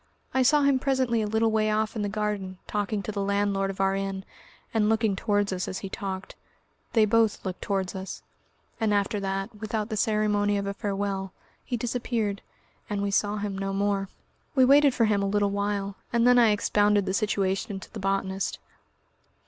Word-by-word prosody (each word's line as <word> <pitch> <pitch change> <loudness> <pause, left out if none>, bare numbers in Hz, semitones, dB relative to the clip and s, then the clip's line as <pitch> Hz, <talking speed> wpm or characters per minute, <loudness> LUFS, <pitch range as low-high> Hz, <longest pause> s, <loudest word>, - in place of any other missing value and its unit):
I 260 - +3
saw 290 +3 +4
him 280 -2 +4
presently 260 -4 +1
a 210 - -1
little 220 +1 +2
way 215 0 +2
off 215 +1 0
in 215 - -2
the 205 - -1
garden, 205 -3 -3
talking 205 0 -2
to 215 - -4
the 200 -1 -3
landlord 200 0 +1
of 195 - -6
our 195 0 +2
inn, 195 0 -3 0.5
and 215 -2 +2
looking 220 -2 +2
towards 205 -1 0
us 185 0 -3
as 185 - -4
he - - -5
talked 190 -1 -5 0.6
they 220 -2 +5
both 220 0 +2
looked 185 -1 -4
towards 190 -2 -1
us 190 0 -6 0.6
and 215 -2 +2
after 205 +1 0
that, 195 +2 -3
without 215 +1 -3
the 220 - -2
ceremony 205 -1 +2
of 200 - -2
a 200 - -2
farewell, 195 -2 -3 0.3
he 245 - -2
disappeared, 225 -3 -2 0.5
and 205 -1 -1
we 200 - -1
saw 205 +1 +1
him 205 -1 -3
no 195 0 -3
more. 200 -1 0 0.5
We 260 -2 +6
waited 280 0 +6
for 230 - +3
him 210 -2 +2
a 200 - 0
little 205 0 +1
while, 200 -1 -2
and 235 0 +3
then 245 0 +6
I 230 -2 +6
expounded 205 -1 +2
the 190 - -1
situation 195 0 0
to - - -13
the 220 - -6
botanist.... 195 0 -1
205 Hz, 195 wpm, -27 LUFS, 195-220 Hz, 0.6 s, We